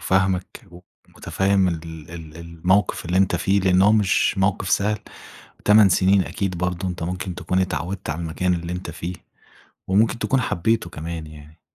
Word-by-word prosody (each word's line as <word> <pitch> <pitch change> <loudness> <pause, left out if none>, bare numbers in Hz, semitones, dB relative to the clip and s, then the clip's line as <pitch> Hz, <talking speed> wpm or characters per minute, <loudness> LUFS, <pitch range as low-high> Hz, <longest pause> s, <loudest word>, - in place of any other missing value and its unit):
فاهمك 95 -3 0 0.4
ومتفهّم 95 -1 0
ال 85 -2 -3 0.3
ال 80 -2 -10
الموقف 85 +5 0
اللي 90 +2 -1
أنت 95 -2 +3
فيه 95 +3 +1
لأن 95 0 +3
هو 105 +2 +5
مش 105 -1 +2
موقف 95 0 0
سهل، 105 +1 +1 0.7
8 105 -1 +7
سنين 95 +2 +4
أكيد 95 -3 -3
برضه 90 +1 -2
أنت 90 -2 -4
ممكن 90 +1 -4
تكون 90 +1 -1
اتعوّدت 90 0 -3
على 80 - -3
المكان 90 +3 -1
اللي 85 0 -4
أنت 90 -2 -6
فيه، 85 +2 -6 0.7
وممكن 110 +4 +2
تكون 135 +2 +1
حبيته 110 -1 0
كمان 80 0 -6
يعني. 75 +1 -14
90 Hz, 160 wpm, -22 LUFS, 85-95 Hz, 0.7 s, 8